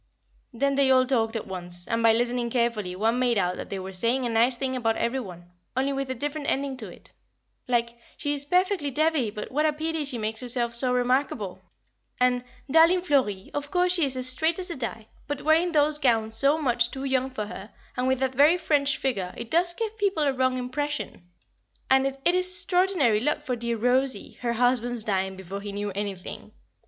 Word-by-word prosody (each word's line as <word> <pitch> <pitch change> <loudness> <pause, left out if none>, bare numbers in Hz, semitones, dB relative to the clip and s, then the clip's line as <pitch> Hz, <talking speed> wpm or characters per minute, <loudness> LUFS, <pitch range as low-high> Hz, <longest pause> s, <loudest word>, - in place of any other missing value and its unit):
Then 275 +3 0
they 275 -1 +3
all 255 -1 +5
talked 230 -3 0
at 225 - -3
once, 175 -1 -2
and 230 -1 -1
by 230 0 +6
listening 240 +1 0
carefully 230 -6 -1
one 225 +5 +1
made 245 -3 +2
out 180 -2 0
that - - -7
they 195 - -4
were 190 0 -7
saying 235 +7 0
a - - -1
nice 235 +3 +3
thing 260 0 -2
about 225 -3 0
every 250 +3 -1
one, 175 -6 -10 0.3
only 270 +2 +1
with 275 -1 -3
a 260 - -2
different 290 +3 -4
ending 275 0 -1
to 220 -4 -7
it, - - -16 0.5
like: 235 -1 0 0.2
"she 290 - -1
is 285 -1 +1
perfectly 360 0 +1
devey 300 -3 +1
but 210 0 -7
what 300 +4 +2
a - - +2
pity 315 +1 -2
she 275 -4 0
makes 220 0 -3
herself 240 -1 0
so 250 +2 +2
remarkable," 250 -5 -1 0.6
and 250 0 +2 0.3
"Darling 335 +4 +5
Florrie, 255 - 0
of 290 0 -4
course 360 +1 +2
she 345 -3 +3
is 265 -2 +1
as 255 0 +2
straight 320 +6 +2
as 370 -1 -3
a - - -4
die, 230 -4 -4 0.2
but 290 -1 -4
wearing 325 +3 +3
those 300 -1 +2
gowns 225 -5 +2
so 275 +7 +3
much 240 -5 +2
too 265 +1 -7
young 265 -1 0
for 220 -5 -4
her, 205 +1 -9 0.2
and 250 +1 -1
with 260 0 +2
that 265 -1 0
very 295 +6 +5
French 290 -4 +1
figure, 200 -9 -2
it 235 0 -7
does 345 +1 +3
give 445 +1 -3
people 390 -6 +1
a 280 -2 +2
wrong 255 0 +1
impression," 250 -8 -4 0.6
and 265 0 +4 0.2
"It 345 - +4
is 365 0 +3
extraordinary 360 - +3
luck 295 +5 0
for 255 -4 -2
dear 235 0 -3
Rosie, 255 +3 0
her 235 -1 -1
husband's 245 -1 +1
dying 190 -2 -1
before 190 +1 -7
he 205 0 -6
knew 205 0 -4
anything." 195 -1 -6
255 Hz, 210 wpm, -26 LUFS, 225-290 Hz, 0.6 s, by